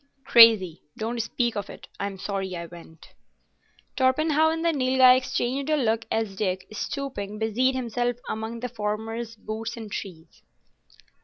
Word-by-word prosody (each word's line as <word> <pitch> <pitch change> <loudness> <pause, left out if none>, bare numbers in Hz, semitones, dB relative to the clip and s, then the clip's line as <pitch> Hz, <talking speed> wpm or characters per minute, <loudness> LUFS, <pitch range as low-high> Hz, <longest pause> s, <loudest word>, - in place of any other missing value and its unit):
"Crazy. 220 -8 +6 0.2
Don't 230 +2 -2
speak 235 +1 -1
of 205 -1 -4
it. - - -11
I'm 200 -1 -4
sorry 195 -1 -4
I 170 0 -5
went." 165 -1 -14 0.9
Torpenhow 305 +4 +3
and 325 +1 -2
the 335 - +3
Nilghai 255 -2 +5
exchanged 260 +2 -1
a 305 - +3
look 225 -4 0
as 220 -3 -1
Dick, 185 -2 -2
stooping, 215 -5 -4
busied 230 +4 +1
himself 245 -1 -1
among 220 +1 -4
the 250 - -3
former's 225 +1 -4
boots 225 +2 -6
and 220 -3 -8
trees. 170 -6 -8
225 Hz, 145 wpm, -25 LUFS, 205-255 Hz, 0.9 s, Crazy